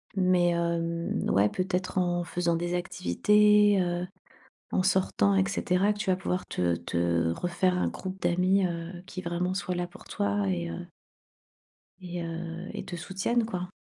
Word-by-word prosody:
Mais, 185 -2 +3
hem, 170 0 -1
ouais, 100 +2 +4
peut-être 185 0 -2
en 175 -1 +1
faisant 170 -1 0
des 175 +1 -1
activités, 205 +3 +4
heu, 175 0 -1 0.7
en - - +2
sortant 185 - +2
et 95 0 +3
cetera, 190 +3 +1
que 210 - -8
tu 205 -3 -1
vas 185 - +3
pouvoir 180 0 -2
te 85 -1 0
te 85 -1 0
refaire 180 - 0
un - - +1
groupe 190 0 -6
d'amis, 185 +3 +3
heu, 170 0 -4
qui 185 - -6
vraiment 175 +2 -1
soit 185 -1 -2
là 175 0 -2
pour 175 - -15
toi 100 -1 -1
et 85 -2 -1
heu 85 - -6 1.1
et 175 -1 -5
heu, 170 +2 -5
et - - -5
te 175 - -5
soutiennent 195 +7 -1
quoi. 180 -4 -4
175 Hz, 165 wpm, -28 LUFS, 170-185 Hz, 1.1 s, ouais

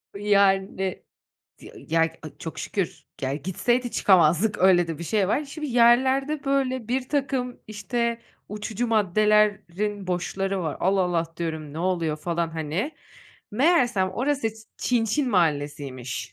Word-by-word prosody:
Yani, 195 -2 +1 0.6
tı - - -16
ya, 165 +1 0
aaa, 160 -2 -3
çok 160 -1 -7
şükür, 195 -4 -3 0.2
ya 135 +1 -1
gitseydi 215 - -1
çıkamazdık 185 +2 +3
öyle 180 -2 +5
de 160 -2 -4
bir 170 - -6
şey 200 0 +1
var. 295 - +1
Şimdi 300 +2 -6
yerlerde 260 +4 +3
böyle 260 -4 0
birtakım, 260 -1 -1
işte, 230 +3 -2 0.3
uçucu 210 +3 -3
maddelerin 210 -1 +1
boşları 190 +2 -2
var 155 - -3
Allah 190 +1 +2
Allah 170 -2 -1
diyorum 160 -3 -4
ne 155 - -6
oluyor 170 -4 0
falan, 170 +1 -2
hani, 165 - -3 0.6
meğersem 245 - +2
orası 265 +3 0 0.3
Çinçin 245 +2 0
Mahallesi'ymiş. 145 - -1
200 Hz, 125 wpm, -25 LUFS, 170-240 Hz, 0.6 s, öyle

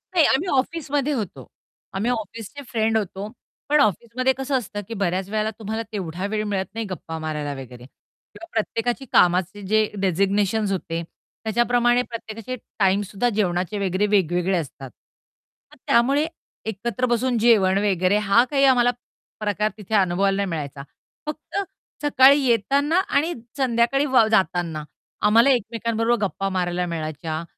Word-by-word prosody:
नाही, 330 - +6
आम्ही 315 +8 +2
ऑफिसमध्ये 290 0 -1
होतो. 190 - -5 0.5
आम्ही 210 +6 0
ऑफिसचे 230 +3 -5
फ्रेंड 225 -1 +1
होतो, 200 -1 -4 0.4
पण 300 0 +4
ऑफिसमध्ये 235 +6 +1
कसं 270 0 0
असतं, 205 -3 -5
की 230 - -6
बऱ्याच 190 -1 -1
वेळेला 215 0 0
तुम्हाला 220 +1 -3
तेवढा 185 -3 -4
वेळ 215 0 -1
मिळत 195 -2 -1
नाही 225 0 -3
गप्पा 165 -2 -6
मारायला 150 -2 -3
वगैरे 125 -2 -10
किंवा 335 - -17
प्रत्येकाची 235 +4 -1
कामाचे 180 +3 +3
जे 215 +1 +3 0.2
डेझिग्नेशन्स 200 +3 +1
होते. 170 -3 -2 0.4
त्याच्याप्रमाणे 240 +2 +2
प्रत्येकाचे 230 +2 -6 0.2
टाईम 195 +1 +3
सुद्धा 205 +5 -1
जेवणाचे 185 0 0
वगैरे 190 +3 +1
वेगवेगळे 185 -2 +2
असतात. 135 -4 -6 0.8
तर - - -17
त्यामुळे 275 +6 +3 0.4
एकत्र 235 +4 -2
बसून 240 0 +1
जेवण 210 -5 +4
वगैरे 190 0 +2
हा 235 +4 +6
काही 275 -1 +2
आम्हाला 245 -2 +5 0.5
प्रकार 210 0 0
तिथे 215 +1 -3
अनुभवायला 195 +1 +2
नाही 200 - 0
मिळायचा. 145 -4 -5 0.4
फक्त 305 +5 -6 0.5
सकाळी 280 -1 +6
येताना 280 - +2
आणि 325 -2 +1 0.2
संध्याकाळी 260 +1 +2
वा 255 -5 +4
जाताना 175 -6 +1 0.4
आम्हाला 230 +5 +5
एकमेकांबरोबर 230 -1 0
गप्पा 195 0 -2
मारायला 180 -1 -1
मिळायच्या 160 -1 -4
215 Hz, 135 wpm, -23 LUFS, 185-240 Hz, 0.8 s, नाही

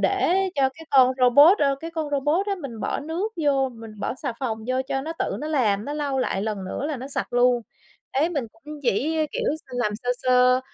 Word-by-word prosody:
để - - +2 0.2
cho 270 -1 +3
cái 320 - -12
con 260 -2 +6
robot, 285 - +7
ơ, 275 -2 +2
cái 330 +1 -6
con 315 -3 -4
robot 295 +8 +1
á 400 - 0
mình 235 -6 -7
bỏ - - -2
nước 340 +9 -3
vô, 275 -2 +2
mình 225 -3 -11
bỏ - - -2
xà 270 -1 -4
phòng 230 -5 -2
vô 255 +1 0
cho 270 - -1
nó 315 +4 -4
tự - - -1
nó 305 - -4
làm, 220 -9 +1
nó 290 - -4
lau 285 -3 -2
lại 200 -6 -1
lần 210 -3 -3
nữa 225 +9 -4
là 300 -3 -3
nó 260 +3 -7
sạch 275 - -4
luôn. 245 -1 +3 0.5
Ế, 295 +5 +1
mình 285 -8 -2
cũng 295 +7 -11
chỉ, 280 +6 +1
ơ, 310 - +2
kiểu, - - -2
s - - -18
làm 245 -5 -2
sơ 245 - 0
sơ, 255 0 +4
270 Hz, 240 wpm, -24 LUFS, 245-300 Hz, 0.5 s, robot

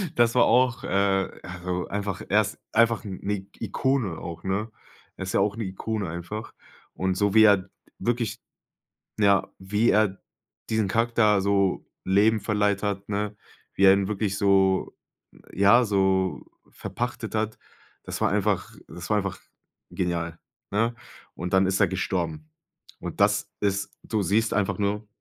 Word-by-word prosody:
Das 120 -1 +4
war 125 - +6
auch 125 -1 +3
äh, 95 -1 +1
also 90 0 -4
einfach 100 -1 -3
er 105 +2 +4
ist 105 0 -5
einfach 115 0 +3
'ne 95 -3 -6
I 95 -1 -6
Ikone 115 - -1
auch, 85 -1 -7
ne? 100 +4 -2 0.5
Er - - -4
ist 95 - -4
ja - - +3
auch 100 +1 +1
'ne 115 - -2
Ikone 95 +1 -3
einfach. 85 +7 -6 0.4
Und 95 0 -1
so 100 +1 +1
wie 110 0 +7
er 100 -3 +4 0.3
wirklich, 120 -3 -1 0.8
ja, 100 -2 +3
wie 105 +4 +1
er 105 -2 +2 0.5
diesen 110 -3 +1
Charakter 115 -1 +3
so 100 -1 +1 0.2
Leben 105 +3 +3
verleiht 105 -1 0
hat, 100 -1 -3
ne, 105 0 -2 0.4
wie 100 - +2
er 95 - +9
ihn 100 0 +1
wirklich 105 -1 -1
so 95 -1 +2 0.6
ja, 100 +6 +5
so 95 -3 +1 0.3
verpachtet 120 -2 -5
hat, 110 0 -1 0.5
das - - -5
war - - +2
einfach 105 -1 0 0.2
das 85 +3 -9
war 105 - +3
einfach 100 -2 -3 0.5
genial, 85 -2 -2 0.3
ne? 115 +4 +1 0.4
Und 90 +2 -5
dann 95 0 +4
ist 95 0 0
er - - +5
gestorben. 85 -5 -3 0.5
Und - - -7
das - - +2
ist 100 -1 -1
du 110 -2 -1
siehst 105 +5 +1
einfach 100 -2 0
nur 105 +1 -1
100 Hz, 155 wpm, -25 LUFS, 95-110 Hz, 0.8 s, er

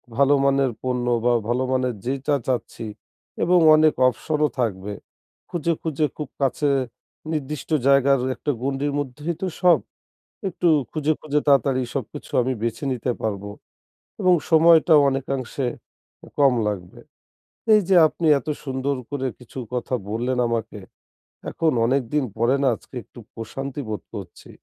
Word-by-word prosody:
ভালো 140 +2 +4
মানের 135 -2 +2
পণ্য 125 -1 -1 0.2
বা 120 - +4 0.2
ভালো 125 +2 +1
মানের 125 -2 0
যে 130 - 0
চা 145 - +3
চাচ্ছি 115 -2 -3 0.6
এবং 180 +1 +4 0.2
অনেক 155 0 +4
অবশনও 150 +5 0
থাকবে। 105 -3 -2 0.6
খুঁজে, 170 -1 0
খুঁজে, 155 -1 0
খুব 150 -4 -5
কাছে 140 +2 +1 0.6
নির্দিষ্ট 150 -1 -4 0.2
জায়গার 140 -1 +5 0.2
একটা 145 - -2
গণ্ডির 140 +2 -1
মধ্যেই 145 +5 -4
তো 190 - -1
সব 180 -2 +6 0.7
একটু 175 -1 0 0.2
খুঁজে, 155 0 0
খুঁজে, 150 -1 0
তাড়াতাড়ি 135 -1 +3
সবকিছু 130 -6 -6
আমি 130 - -1
বেছে 115 +4 -2
নিতে 125 0 -2
পারব 100 -3 -2 0.8
এবং 180 -1 +5 0.2
সময়টাও 160 -1 +6
অনেকাংশে 135 -1 -3 0.7
কম 140 -2 +5 0.2
লাগবে। 90 -4 -6 0.7
এই 210 - +7
যে 190 - +4
আপনি 165 - -4
এত 155 - -11 0.2
সুন্দর 135 0 -2
করে 140 -2 -2
কিছু 125 +1 -12 0.2
কথা 125 +1 -2 0.2
বললেন 125 +3 -1
আমাকে, 115 -2 -3 0.7
এখন 160 -1 +1
অনেক 135 +3 +2
দিন 150 -3 +2
পরে 120 +4 +3
না 135 - +3
আজকে 130 - -17
একটু 120 - -15
প্রশান্তি 135 +5 -6
বোধ 105 - -3
করছি। 95 -5 -10
135 Hz, 140 wpm, -23 LUFS, 125-150 Hz, 0.8 s, এই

